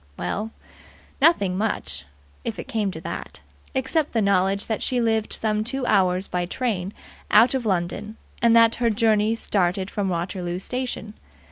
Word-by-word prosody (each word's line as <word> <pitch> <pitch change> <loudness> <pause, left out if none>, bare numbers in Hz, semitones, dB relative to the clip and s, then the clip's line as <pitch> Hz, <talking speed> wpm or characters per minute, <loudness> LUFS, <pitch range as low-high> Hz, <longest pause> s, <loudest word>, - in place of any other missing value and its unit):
Well, 205 - -3 0.7
nothing 205 - +4
much, 220 0 -2 0.4
if 225 - -4
it - - -7
came 220 -6 -1
to 160 -4 -7
that, - - -7 0.3
except 280 +4 0
the 230 - +2
knowledge 195 0 +2
that 220 - -2
she 250 - 0
lived 220 -2 +1
some 215 -1 0
two 260 +3 -2
hours 185 -3 +2
by 180 -1 -2
train 200 -4 -2 0.4
out 230 +5 +6
of 255 -4 -1
London, 190 +3 -2 0.2
and 235 -1 +5
that 230 0 +6
her 235 -1 +2
journey 220 0 +2
started 190 -3 0
from 200 -2 -1
Waterloo 175 0 -3
Station. 245 0 -4
215 Hz, 155 wpm, -24 LUFS, 190-230 Hz, 0.7 s, out